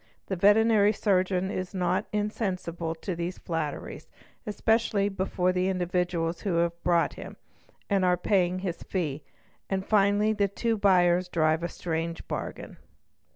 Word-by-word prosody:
The 190 - -3
veterinary 210 +2 +4
surgeon 190 -2 +1
is 185 +1 -4
not 180 0 0
insensible 185 -6 -2
to 175 +2 -5
these 170 +2 -4
flatteries, 160 -4 -5 0.4
"especially 210 -1 +1
before 190 -1 0
the 185 0 0
individuals 175 -2 -1
who 195 -5 -1
have 170 0 0
brought 170 -1 +2
him - - -9 0.5
and 195 -2 +1
are 180 -1 +3
paying 180 -1 +1
his 175 -2 -3
fee, 155 -6 -3 0.5
and 190 0 -1
finally 210 +1 +3
the 205 -1 +1
two 225 +4 -1
buyers 180 -3 +3
drive 160 -2 +1
a 170 - -2
strange 165 0 -4
bargain. - - -6
185 Hz, 140 wpm, -27 LUFS, 170-200 Hz, 0.5 s, veterinary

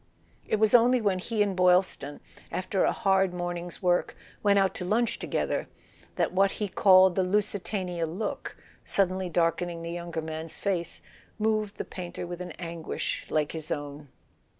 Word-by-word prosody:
It - - +2
was 215 0 +3
only 245 +1 +6
when 200 -4 +1
he 215 +2 0
and 200 -2 -2
Boylston, 180 -5 +2 0.3
after 185 +1 0
a - - +3
hard 190 -2 +2
morning's 175 0 -5
work, 175 -1 +1 0.2
went 200 -1 +4
out 195 -1 +3
to - - -6
lunch 230 +5 +1
together, - - -1 0.5
that - - 0
what 195 +1 +3
he 210 - -2
called 185 -1 +6
the 190 - +1
Lusitania 190 -3 -1
look 195 +6 -4
f - - -25 0.2
suddenly 185 -1 +1
darkening 170 0 0
the 170 - -4
younger 170 -2 -4
man's 160 0 -5
face, 175 -4 -2 0.3
moved 215 -1 0
the - - -4
painter 180 -1 -6
with 175 0 -6
an 180 - -6
anguish 170 -2 -4
like 150 -1 0
his 160 -1 -6
own. 145 0 -5
180 Hz, 165 wpm, -28 LUFS, 170-200 Hz, 0.5 s, only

